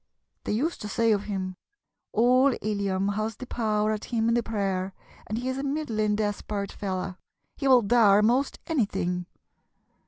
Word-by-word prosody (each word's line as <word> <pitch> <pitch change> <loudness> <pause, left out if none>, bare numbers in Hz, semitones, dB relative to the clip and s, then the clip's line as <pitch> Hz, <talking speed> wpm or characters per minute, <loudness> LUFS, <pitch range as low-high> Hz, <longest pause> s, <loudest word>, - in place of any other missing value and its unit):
They - - -1
used 300 +11 -1
to 210 - -4
say 230 +2 +2
of 205 -1 +1
him: 185 -3 -4 0.5
'Oul 255 +4 +4
Illiam 200 -1 0
has 215 +1 -2
the 255 - -8
power 215 -3 0
at 215 -1 -3
him 230 -2 0
in - - +3
the 240 - +3
prayer, 195 -4 -2 0.3
and 215 - -2
he 250 +2 -3
is 260 +1 -2
a - - -3
middlin' 230 -8 0
despard 205 -1 -2
fella; 185 -1 -4 0.4
he 275 - -2
will 255 -3 +6
dar' 210 -2 +5
most 250 +6 +2
anything.' 180 - -1
215 Hz, 165 wpm, -27 LUFS, 200-240 Hz, 0.5 s, will